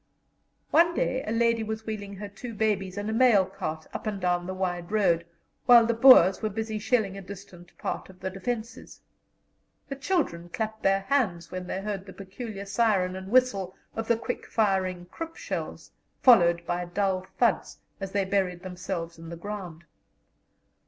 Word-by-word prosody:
One 340 +2 +5
day 260 +1 0
a - - -1
lady 230 0 +2
was 220 0 -4
wheeling 205 -2 -5
her 205 +1 -6
two 230 +3 -9
babies 200 -3 0
in 205 +1 -3
a 220 - -1
mail 225 -5 +5
cart 160 -4 -5
up - - -5
and 205 -2 -2
down 175 -1 0
the 185 - -3
wide 175 -1 -3
road, 170 -6 +2 0.4
while 240 -2 +8
the 235 - +1
Boers 230 -6 +7
were 215 - 0
busily 220 +1 -3
shelling 210 -3 0
a - - -8
distant 185 -2 -12
part - - -4
of 185 -1 -15
the 190 - -4
defences. 225 +4 -5 0.9
The 275 - -3
children 265 - -1
clapped 220 +1 -4
their 195 0 +3
hands 195 -9 0
when 185 -1 -5
they 190 - -3
heard 200 -2 -4
the 190 - -9
peculiar 200 +2 -7
siren 195 -3 +1
and 190 0 -7
whistle 205 -7 +2 0.2
of 225 0 -3
the 235 - +3
quick 245 +2 -5
firing 190 -4 0
Krupp 330 0 -6
shells, - - -5 0.3
followed 170 -9 +6
by 175 +1 -2
dull 185 +1 -1
thuds, - - +1 0.2
as 195 -1 -5
they 200 -1 +1
buried 185 -2 -1
themselves 180 -2 -5
in 165 0 -9
the 170 - -6
ground. 180 -3 -7
195 Hz, 175 wpm, -27 LUFS, 185-225 Hz, 0.9 s, while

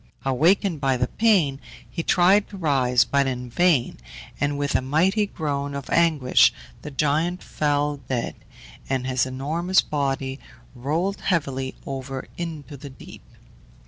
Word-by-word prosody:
Awakened 160 +5 +2
by 135 -2 +2
the 125 - +1
pain, 175 - +2 0.3
he 170 - -4
tried 190 +4 +4
to 200 - -9
rise, 130 -7 +3
but 140 -1 +1
in 125 -2 -4
vain, 165 -4 +2 0.4
and 145 0 0
with 145 0 -1
a - - +2
mighty 180 +10 +2
groan 140 -5 -3
of 140 -1 -6
anguish 155 -7 +4 0.3
the - - -7
giant 155 +5 0
fell 145 -1 0
dead, 120 -3 -1 0.6
and 130 -1 -1
his 130 -1 +1
enormous 160 +8 +1
body 135 -2 -2 0.3
rolled 160 +10 -2
heavily 135 -7 -1
over 135 -1 -5
into 155 -4 -6
the 140 +2 -9
deep. 130 - -13
145 Hz, 140 wpm, -24 LUFS, 135-170 Hz, 0.6 s, tried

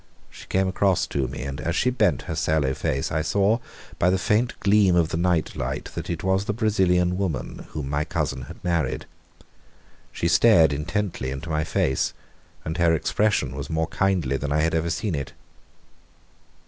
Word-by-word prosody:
She - - -13
came 95 0 +1
across 95 0 +2
to 70 -2 -2
me, - - -6
and 70 0 -5
as 85 0 -2
she 125 +6 +2
bent 105 -7 +1
her 85 - -4
sallow 75 -3 +1
face 70 0 -2
I 80 - 0
saw 100 +7 +2 0.4
by 90 - +4
the 95 - +2
faint 110 +5 0
gleam 100 -2 +4
of 85 -2 +3
the - - -2
night 85 -2 +1
light - - -4
that - - -6
it 85 -2 -3
was 95 +1 +1
the 105 - -2
Brazilian 90 -5 +2
woman 80 -10 -3
whom 70 -2 -4
my 75 +1 +1
cousin 70 -3 -2
had - - -9
married. 85 -3 -1 1.1
She 85 - -1
stared 85 -3 +5
intently 85 -1 -2
into 70 +5 -5
my 75 0 +1
face, 65 -3 0 0.5
and 80 +2 -3
her 85 -1 +4
expression 80 -5 0
was 70 0 -5
more 80 +1 -1
kindly 90 -9 +1
than 70 +1 -4
I 75 +1 +2
had 80 +1 +1
ever 80 +1 0
seen 100 +2 -2
it. 70 -3 -4
85 Hz, 185 wpm, -24 LUFS, 75-95 Hz, 1.1 s, stared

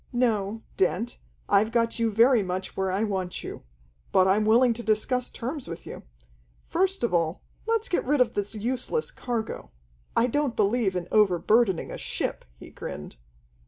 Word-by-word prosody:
No, 225 -3 0
Dent, 205 +6 0 0.3
I've 205 +2 +3
got 230 0 +1
you 230 -1 +2
very 230 +3 +5
much 185 0 -4
where 190 -1 0
I 195 +3 0
want 190 -4 -2
you. - - -7 0.5
But 185 0 +5
I'm 205 +3 +3
willing 235 +3 +5
to 235 - -6
discuss 235 +3 +1
terms 260 +3 -5
with 165 - -7
you. - - -8 0.6
First 380 0 0
of 235 - +1
all, 165 0 0 0.2
let's 455 0 +1
get 355 - 0
rid 290 +2 +1
of 250 - +3
this 205 +2 -2
useless 255 - -1
cargo. 230 - -4 0.5
I 230 - +5
don't 275 0 0
believe 210 -2 +1
in 180 -1 -3
overburdening 210 0 +3
a - - -6
ship," - - -3
he - - -12
grinned. 75 - -8
220 Hz, 165 wpm, -26 LUFS, 195-245 Hz, 0.6 s, very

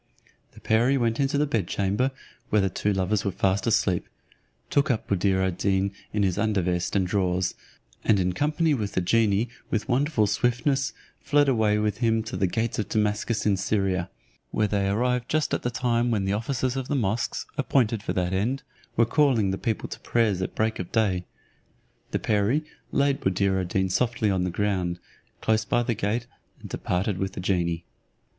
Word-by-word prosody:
The - - -14
perie 120 +5 +2
went 115 -2 0
into 140 0 +1
the 150 - +3
bed 115 - -1
chamber 100 +8 0 0.4
where 105 - +3
the 95 - 0
two 105 - 0
lovers 95 +1 0
were - - 0
fast 95 +2 0
asleep, 95 -5 +1 0.6
took 145 +1 +2
up 120 -4 0
Buddir 95 -1 +2
ad 90 -2 -2
Deen 95 0 +1 0.2
in 105 -1 +1
his 95 0 +1
under 105 -3 +1
vest 90 +1 -1
and 95 -2 +3
drawers; 90 -1 0 0.5
and 105 -3 +3
in 90 0 +1
company 155 - +1
with 105 -7 -2
the 95 - +1
genie 110 +3 +2 0.2
with 110 +1 -1
wonderful 130 -2 +2
swiftness 135 +6 +1 0.3
fled 145 0 +3
away 110 -5 +3
with 105 0 -1
him 115 -2 +2
to 110 +2 -6
the 95 - +1
gates 115 +5 -1
of 105 - -2
Damascus 105 +1 0
in 100 -2 +3
Syria, 95 -2 0 0.4
where 110 - +1
they 100 -1 0
arrived 125 +4 0
just 155 0 0
at - - 0
the 120 - -1
time 120 -1 +1
when 105 -4 0
the 95 - 0
officers 125 +4 -1
of 130 -1 -3
the 145 - -1
mosques, 115 -2 -1
appointed 115 -5 +1
for - - -3
that 90 0 -1
end, 120 +9 0 0.3
were 115 - +5
calling 120 -6 +3
the 95 - -2
people 110 -2 -2
to - - -8
prayers 110 -6 +1
at 95 - -3
break 110 0 0
of 90 - -5
day. 95 -6 +1 0.8
The - - 0
perie 110 +8 +1 0.3
laid 140 0 +2
Buddir 95 0 +1
ad 90 - -3
Deen 95 +2 +1
softly 110 +1 +1
on 95 -1 +1
the - - -1
ground, 90 -2 -1 0.4
close 110 0 +2
by 120 +3 +1
the 120 - 0
gate, 110 +3 -1 0.3
and - - -9
departed 95 +2 -1
with 95 0 -2
the - - -6
genie. 85 -3 0
105 Hz, 190 wpm, -26 LUFS, 95-120 Hz, 0.8 s, were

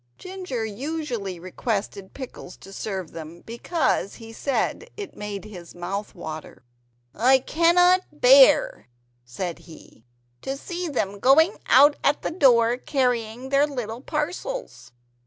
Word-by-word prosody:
Ginger 365 -11 -5
usually 235 - -4
requested 195 +1 -4
Pickles 255 -8 -9
to 195 - -13
serve 190 -5 -5
them, 165 +1 -9
because 235 - -1
he 225 -1 -11
said 280 - -2
it 410 -2 -7
made 205 -1 -6
his 180 -6 -11
mouth 195 +5 -5
water. 155 -5 -8 0.5
"I 255 +5 +4
cannot 350 +6 +4
bear," - - +5 0.4
said 170 +8 -5
he, 160 -8 -16 0.4
"to 270 +1 -4
see 350 +4 -5
them 205 -9 -2
going 320 - +4
out 290 +3 +6
at 290 - +1
the - - -2
door 245 -7 +4
carrying 250 -2 -1
their 280 +2 +3
little 245 -4 -5
parcels." 355 - -4
250 Hz, 125 wpm, -24 LUFS, 200-315 Hz, 0.5 s, out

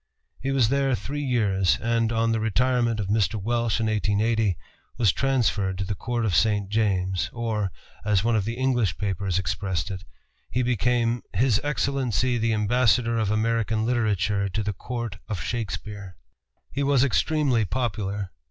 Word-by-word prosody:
He 135 - -3
was 135 -5 +3
there 135 -1 +2
three 145 +4 -4
years, 105 -9 +2
and, 115 0 +1
on 115 0 +1
the 115 - +1
retirement 120 +1 +1
of 105 - -1
Mr. 100 -2 +1
Welsh 115 +2 0
in 115 - 0
1880, 110 -2 +1 0.4
was 115 -6 +4
transferred 110 -8 0
to 100 - -2
the 95 - -2
Court 120 +4 -2
of 100 - 0
St. 105 +2 +2
James, 95 -4 0
or, 110 -5 -2 0.3
as 105 -2 +2
one 115 0 +2
of 105 - +1
the 115 +4 -3
English 120 -7 +1
papers 100 -2 -1
expressed 95 0 -2
it, 95 -1 -6 0.5
he 125 +2 0
became 120 0 +1
"His 115 +2 +2
Excellency 130 -5 0
the 115 0 +1
Ambassador 115 +1 +2
of 110 -3 0
American 110 0 +1
Literature 105 -4 +1
to 105 +4 -2
the 105 0 -2
Court 120 -1 -5
of 105 -5 -3
Shakespeare." 105 -1 -5 0.5
He 140 - -2
was 140 -2 +3
extremely 140 -3 +2
popular. 100 -4 -2
110 Hz, 160 wpm, -25 LUFS, 100-120 Hz, 0.5 s, was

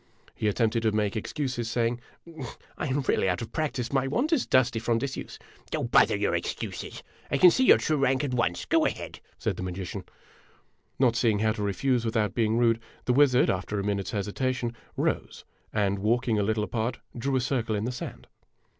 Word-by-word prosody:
He 110 - -2
attempted 115 +2 +1
to 110 -1 +2
make 105 0 0
excuses, 125 0 -3
saying: 120 0 0 0.4
" 130 -4 -10
I - - -3
am 140 +1 0
really 110 -7 +1
out 90 +4 -1
of 115 - -8
prac 155 -2 -1
tice; 120 -2 -3
my 135 -1 +2
wand 260 - +1
is 280 - +1
dusty 125 -3 +3
from 115 0 +1
disuse." 135 +3 -5 0.4
"Oh, - - -2
bother - - +4
your - - 0
excuses! - - -4 0.3
I 140 - +1
can 180 +5 +8
see 260 - +2
your - - +8
true 155 - 0
rank 135 -1 +2
at 135 -3 -2
once. 115 -8 0
Go - - +3
ahead! - - -5
" - - -34
said - - -2
the - - -5
magician. 90 0 -5 0.9
Not 125 -3 +3
seeing 115 -3 +2
how 110 +1 +2
to 105 - -4
refuse 115 +5 +1
without 110 -3 0
being 115 -1 +1
rude, 115 -1 +3 0.3
the 125 - +2
wizard, 135 -2 +5
after 100 +2 -2
a - - -2
minute's 100 -1 -1
hesitation, 120 +4 -2 0.2
rose - - -2 0.3
and, 100 -2 0
walking 115 +1 +1
a - - +2
little 110 +1 0
apart, 115 +3 -2 0.2
drew 135 +3 -1
a - - +3
circle 120 -3 -1
in 105 +1 -1
the 125 - -1
sand. 125 - -7
115 Hz, 205 wpm, -27 LUFS, 105-130 Hz, 0.9 s, can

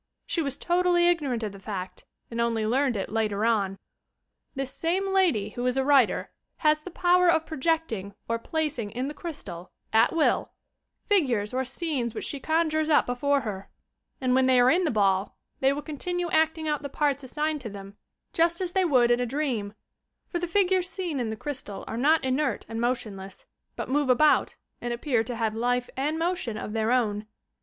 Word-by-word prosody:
She 335 - -1
was 275 -3 -3
totally 350 0 +3
ignorant 285 -9 +1
of 210 - -2
the 195 - -11
fact 190 -2 -6 0.3
and 230 0 -1
only 230 -2 0
learned 255 +1 +1
it 195 - -4
later 215 -1 0
on. 200 -4 +1 0.8
This 270 -1 -3
same 380 +4 0
lady 325 - +2
who 245 +3 -5
is 250 +1 0
a 265 - +1
writer, 275 -5 +3 0.3
has 305 0 +4
the 370 - -8
power 360 0 +3
of 320 -1 +3
projecting 265 - -1
or 230 0 -1
placing 295 -6 -2
in 250 +5 -3
the - - -6
crystal, 200 - -7 0.2
at 220 - +5
will, 325 - +1 0.5
figures 255 - +2
or 260 +1 0
scenes 260 -3 -3
which - - -4
she 285 - -3
conjures 315 +1 +1
up 300 - +5
before 280 +3 +1
her 200 -4 -6 0.5
and 255 -1 +1
when 260 0 +4
they 255 -1 +5
are 245 +1 +6
in 360 +2 +3
the - - +2
ball, 195 -4 +1 0.2
they 270 0 +4
will 290 +1 -3
continue 350 +3 -3
acting 320 0 +2
out 295 -2 0
the 285 - -5
parts 285 -1 0
assigned 300 +3 -2
to 235 - -6
them, 200 0 -10 0.4
just 335 +1 +2
as 360 -2 -3
they 380 - +3
would 255 -8 +4
in 240 - +3
a 245 - 0
dream, 235 -7 -2 0.3
— - - -55
for 345 - -2
the 350 - -2
figures 370 0 +2
seen 350 -7 -3
in 235 -3 -1
the 220 - -3
crystal 250 -5 -6
are - - -4
not 295 +5 +3
inert 260 -2 0
and 225 +1 -4
motion 240 -4 -1
less, 190 0 -10 0.3
but - - -4
move 285 0 +1
about 295 +5 +4 0.3
and 240 0 -2
appear 240 -1 0
to 240 +2 -5
have 225 -2 -1
life 245 +2 0
and 295 +4 -1
motion 335 - -1
of 210 - -5
their 220 +1 0
own. 215 -4 +1
265 Hz, 200 wpm, -27 LUFS, 225-315 Hz, 0.8 s, are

